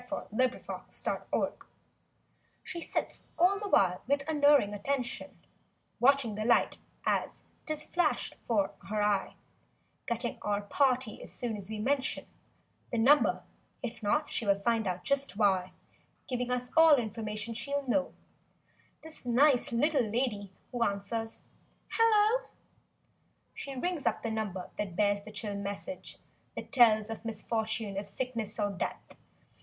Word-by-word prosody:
THE 255 Hz, +4 st, +3 dB
TELEPHONE -, -, -5 dB
GIRL -, -, 0 dB, 1.1 s
She 340 Hz, -, -5 dB
sits -, -, -3 dB
all 370 Hz, +4 st, +4 dB
the 415 Hz, -1 st, -4 dB
while 180 Hz, -, +4 dB
with 280 Hz, +1 st, +1 dB
unerring 290 Hz, -8 st, +4 dB
attention 250 Hz, +4 st, -3 dB, 0.6 s
Watching 270 Hz, -3 st, +4 dB
the 215 Hz, +1 st, -3 dB
light 235 Hz, +2 st, +3 dB, 0.3 s
as -, -, 0 dB, 0.2 s
'tis 310 Hz, -1 st, -3 dB
flashed 350 Hz, 0 st, 0 dB
'fore 210 Hz, -5 st, +2 dB, 0.2 s
her 210 Hz, 0 st, +1 dB
eye; 205 Hz, -1 st, +1 dB, 0.7 s
Getting 235 Hz, +1 st, -2 dB
our 205 Hz, 0 st, 0 dB
"party" 255 Hz, 0 st, +1 dB
as -, -, -10 dB
soon 235 Hz, -3 st, -3 dB
as 200 Hz, -1 st, -7 dB
we 220 Hz, -, -4 dB
mention 265 Hz, +5 st, 0 dB, 0.7 s
The 235 Hz, -, -1 dB
number—if 240 Hz, -2 st, +1 dB
not 260 Hz, +9 st, +1 dB
she -, -, -2 dB
will 200 Hz, -2 st, +3 dB
find 225 Hz, 0 st, +1 dB
out 180 Hz, -1 st, -2 dB
just 280 Hz, -6 st, 0 dB
why— 190 Hz, -4 st, +2 dB, 0.6 s
Giving 250 Hz, -1 st, -2 dB
us 250 Hz, 0 st, -2 dB
all 325 Hz, -2 st, +8 dB
information 220 Hz, -2 st, -3 dB
she'll 280 Hz, +3 st, -3 dB
know— 275 Hz, +3 st, +1 dB, 0.9 s
This 320 Hz, 0 st, -8 dB
nice 250 Hz, +2 st, +4 dB
little 285 Hz, +4 st, +3 dB
lady 210 Hz, -4 st, -1 dB, 0.2 s
who 245 Hz, -, -3 dB
answers—"Hello!" 415 Hz, -, 0 dB, 1.0 s
She 275 Hz, -1 st, -7 dB
rings 335 Hz, +3 st, -1 dB
up -, -, 0 dB
the 230 Hz, -, -1 dB
number 205 Hz, -5 st, -3 dB
that 195 Hz, -4 st, -3 dB
bears 205 Hz, 0 st, +2 dB
the 215 Hz, -, -10 dB
chill 210 Hz, -1 st, -4 dB
message 200 Hz, +7 st, -6 dB, 0.4 s
That -, -, -7 dB
tells 225 Hz, -5 st, +5 dB
of 225 Hz, -, -6 dB
misfortune, 220 Hz, -2 st, -2 dB
of 200 Hz, -, -7 dB
sickness 230 Hz, -2 st, -4 dB
or 205 Hz, -1 st, +1 dB
death. 190 Hz, -, -5 dB
230 Hz, 135 wpm, -31 LUFS, 210-280 Hz, 1.1 s, all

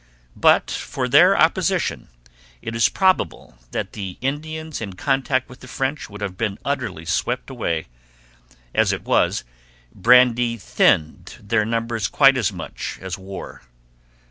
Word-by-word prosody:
But -, -, +4 dB
for -, -, -3 dB
their -, -, +6 dB
opposition -, -, +1 dB, 0.5 s
it 115 Hz, -, -6 dB
is 115 Hz, -4 st, +3 dB
probable 185 Hz, -, 0 dB
that -, -, -4 dB
the 95 Hz, -3 st, -6 dB
Indians 155 Hz, +3 st, -4 dB
in 100 Hz, -3 st, -5 dB
contact 130 Hz, +4 st, 0 dB
with 125 Hz, -, -14 dB
the 130 Hz, -, -13 dB
French 135 Hz, +2 st, -3 dB
would 105 Hz, 0 st, -10 dB
have 100 Hz, -3 st, -4 dB
been 105 Hz, 0 st, -2 dB
utterly 120 Hz, -, -3 dB
swept 120 Hz, +9 st, -2 dB
away; 85 Hz, -, -2 dB, 0.9 s
as -, -, +3 dB
it -, -, -4 dB
was, -, -, +1 dB, 0.5 s
brandy 120 Hz, +1 st, +4 dB
thinned 80 Hz, -5 st, +1 dB
their 105 Hz, +1 st, 0 dB
numbers 115 Hz, -2 st, -1 dB
quite 135 Hz, -2 st, +5 dB
as 115 Hz, -7 st, 0 dB
much 90 Hz, -4 st, -6 dB
as 95 Hz, 0 st, -6 dB
war. 95 Hz, +1 st, -9 dB
115 Hz, 140 wpm, -21 LUFS, 95-130 Hz, 0.9 s, their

